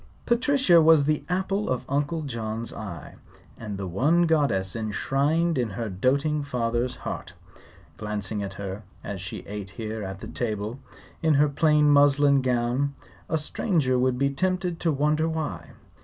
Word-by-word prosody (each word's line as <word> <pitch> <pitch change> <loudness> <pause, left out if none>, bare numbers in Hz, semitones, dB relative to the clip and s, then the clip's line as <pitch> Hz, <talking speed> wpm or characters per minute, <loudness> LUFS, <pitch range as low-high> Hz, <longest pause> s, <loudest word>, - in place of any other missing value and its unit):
Patricia 245 - +4
was 155 -2 +6
the 150 0 0
apple 190 +3 -1
of 130 - -1
Uncle 145 +3 -1
John's 115 -3 -4
eye, 85 -9 -8 0.4
and 105 -3 -6
the 95 - -4
one 145 - +2
goddess 140 - +1
enshrined 140 +8 0
in 120 -2 0
her 110 +2 -4
doting 140 +10 +1
father's 125 -2 -1
heart. - - -5 0.6
Glancing 105 -1 -3
at 100 -1 -5
her, 100 0 -5 0.2
as 100 -2 -5
she 95 - -6
sat 100 -1 -7
here 110 +2 -5
at 95 0 -7
table 110 +1 -3 0.4
in 160 -3 +3
her 145 +2 +5
plain 150 0 +3
muslin 145 -1 +5
gown, 125 +2 0 0.3
a 160 - +1
stranger 150 - 0
would 125 0 +1
be 140 +1 +1
tempted 180 +3 -1
to 165 - +1
wonder 150 +3 +1
why. 160 -2 -4
135 Hz, 150 wpm, -26 LUFS, 110-155 Hz, 0.6 s, was